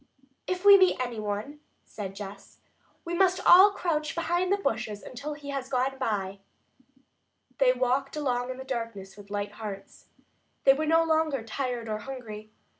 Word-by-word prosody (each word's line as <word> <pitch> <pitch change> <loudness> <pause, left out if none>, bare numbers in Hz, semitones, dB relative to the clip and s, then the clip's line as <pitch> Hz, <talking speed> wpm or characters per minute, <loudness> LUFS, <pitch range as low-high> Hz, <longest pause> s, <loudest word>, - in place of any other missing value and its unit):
"If 365 +1 -3
we 400 -1 +10
meet 370 -7 +4
any 245 -3 -3
one," 210 +8 -4 0.2
said 195 -2 -7
Jess, 200 0 -10 0.5
"we 340 - -4
must 370 +1 +3
all 375 +3 +9
crouch 325 -6 -2
behind 350 +2 0
bushes 220 -2 -2
until 290 +4 -6
he 290 -1 -10
has 270 -2 -4
gone 265 0 -1
by." 200 -5 -2 1.2
They 265 -2 +5
walked 260 +2 0
along 250 -4 -1
in 255 - -5
the 265 - -7
darkness 230 -7 -5
with 205 -1 -14
light 205 0 -3
hearts. 205 -2 -9 0.6
They 270 - +7
were 310 +3 -2
no 325 +1 +4
longer 315 -5 +1
tired 240 0 -3
or 215 -1 -3
hungry. 215 -4 -8
255 Hz, 160 wpm, -28 LUFS, 215-305 Hz, 1.2 s, we